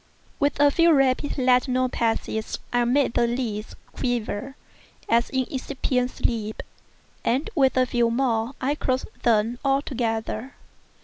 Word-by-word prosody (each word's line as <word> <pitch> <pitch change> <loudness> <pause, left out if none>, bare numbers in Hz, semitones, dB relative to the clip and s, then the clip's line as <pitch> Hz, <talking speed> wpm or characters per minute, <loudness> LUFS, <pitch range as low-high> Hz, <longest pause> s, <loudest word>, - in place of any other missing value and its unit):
With 285 0 +1
a 290 0 +6
few 335 +3 +4
rapid 270 +1 +2
lateral 255 0 +3
passes 225 -2 -2 0.2
I 245 0 +3
made 255 0 +2
the 240 -1 +2
lids 235 -3 -3 0.2
quiver, 245 +1 -3 0.5
as 235 +1 +2
in 260 -1 0
incipient 260 -2 -1
sleep, 220 -4 -3 0.6
and 275 - 0
with 270 -5 +3
a 255 - +4
few 240 -1 +1
more 235 0 0
I 270 +3 0
closed 260 -3 -2
them 230 +1 +2
altogether. 255 -3 -1
250 Hz, 130 wpm, -24 LUFS, 230-270 Hz, 0.6 s, a